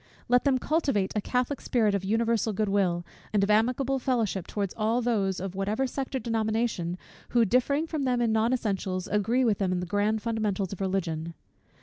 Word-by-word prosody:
Let 245 Hz, +2 st, +3 dB
them 270 Hz, -2 st, +4 dB
cultivate 275 Hz, -, 0 dB
a 210 Hz, -, +1 dB
catholic 250 Hz, +5 st, -1 dB
spirit 220 Hz, -5 st, +2 dB
of 200 Hz, -2 st, -1 dB
universal 225 Hz, +1 st, +1 dB
good 210 Hz, +1 st, 0 dB
will, 180 Hz, -4 st, +1 dB, 0.3 s
and 205 Hz, -2 st, +2 dB
of 200 Hz, -, +2 dB
amicable 250 Hz, +5 st, +2 dB
fellowship 230 Hz, -8 st, -1 dB
towards 200 Hz, -3 st, -3 dB
all 225 Hz, +2 st, +1 dB
those, 205 Hz, -6 st, 0 dB
of 190 Hz, 0 st, -4 dB
whatever 205 Hz, +7 st, -1 dB
sect 265 Hz, +1 st, -4 dB
or -, -, +2 dB
denomination, 220 Hz, -6 st, -1 dB, 0.3 s
who, 235 Hz, -1 st, +4 dB
differing 270 Hz, -, +2 dB
from 315 Hz, -2 st, -3 dB
them 250 Hz, -2 st, +1 dB
in 235 Hz, -2 st, +2 dB
non 220 Hz, +2 st, +2 dB
essentials, 195 Hz, -6 st, -1 dB
agree 230 Hz, +5 st, +1 dB
with 215 Hz, -4 st, +2 dB
them 190 Hz, -2 st, +1 dB
in 180 Hz, -, 0 dB
the 180 Hz, -, -3 dB
grand 205 Hz, +3 st, 0 dB
fundamentals 210 Hz, -4 st, -1 dB
of 195 Hz, -, -8 dB
Religion. 170 Hz, -4 st, -2 dB
220 Hz, 195 wpm, -27 LUFS, 195-245 Hz, 0.3 s, them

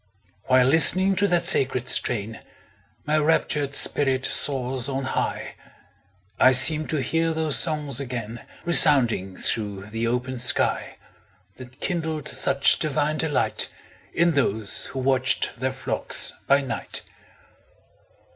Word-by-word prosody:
While 130 Hz, -1 st, +3 dB
listening 185 Hz, +7 st, +6 dB
to 200 Hz, -, +2 dB
that 175 Hz, -2 st, +1 dB
sacred 130 Hz, -6 st, +2 dB
strain, 115 Hz, -1 st, -2 dB, 0.7 s
My 155 Hz, +1 st, +1 dB
raptured 150 Hz, -2 st, 0 dB
spirit 135 Hz, -2 st, +1 dB
soars 130 Hz, -1 st, +1 dB
on 135 Hz, 0 st, -3 dB
high; 130 Hz, -, -3 dB, 0.9 s
I 130 Hz, -, +5 dB
seem 155 Hz, +4 st, +3 dB
to 150 Hz, -4 st, -2 dB
hear 165 Hz, +5 st, -1 dB
those 160 Hz, -2 st, -1 dB
songs 150 Hz, -5 st, -3 dB
again 120 Hz, -4 st, -6 dB, 0.2 s
Resounding 120 Hz, -, +2 dB
through 105 Hz, -2 st, -3 dB
the 115 Hz, +1 st, -3 dB
open 125 Hz, +1 st, -3 dB
sky, 125 Hz, -, -1 dB, 0.6 s
That 130 Hz, 0 st, -14 dB
kindled 160 Hz, -4 st, -3 dB
such 140 Hz, 0 st, +2 dB
divine 155 Hz, 0 st, -2 dB
delight, 155 Hz, -3 st, -1 dB, 0.4 s
In 170 Hz, 0 st, +2 dB
those 110 Hz, -8 st, -1 dB
who -, -, -9 dB
watched 130 Hz, 0 st, 0 dB
their 130 Hz, +1 st, -1 dB
flocks 130 Hz, 0 st, -3 dB
by 140 Hz, +1 st, +3 dB
night. 125 Hz, -5 st, -6 dB
135 Hz, 120 wpm, -23 LUFS, 125-155 Hz, 0.9 s, listening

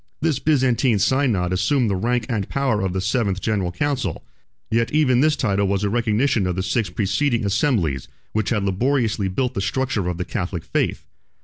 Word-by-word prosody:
This 155 Hz, -4 st, 0 dB
Byzantine 130 Hz, -5 st, +2 dB
synod 105 Hz, -6 st, +1 dB
assumed 120 Hz, +7 st, +2 dB
the 100 Hz, -, 0 dB
rank 120 Hz, +4 st, 0 dB
and 105 Hz, -6 st, -2 dB
powers 130 Hz, -7 st, 0 dB
of 95 Hz, -, -1 dB
the 95 Hz, +1 st, -2 dB
seventh 100 Hz, -2 st, 0 dB
general 100 Hz, -4 st, -1 dB
council; 145 Hz, +8 st, -2 dB, 0.5 s
yet 115 Hz, +1 st, +1 dB
even 130 Hz, -5 st, +3 dB
this 155 Hz, +1 st, +3 dB
title 100 Hz, -7 st, 0 dB
was 100 Hz, +1 st, 0 dB
a 100 Hz, -, 0 dB
recognition 115 Hz, -2 st, +1 dB
of 90 Hz, -, -1 dB
the 95 Hz, -, -2 dB
six 110 Hz, -1 st, 0 dB
preceding 110 Hz, +6 st, 0 dB
assemblies, 100 Hz, -, 0 dB, 0.2 s
which 110 Hz, -1 st, -1 dB
had 105 Hz, -4 st, 0 dB
laboriously 110 Hz, +1 st, 0 dB
built 125 Hz, +7 st, -1 dB
the 100 Hz, -, -2 dB
structure 110 Hz, -2 st, -1 dB
of 90 Hz, -1 st, -2 dB
the 90 Hz, -, -3 dB
Catholic 90 Hz, -5 st, -4 dB
faith. -, -, -1 dB
110 Hz, 185 wpm, -22 LUFS, 95-130 Hz, 0.5 s, even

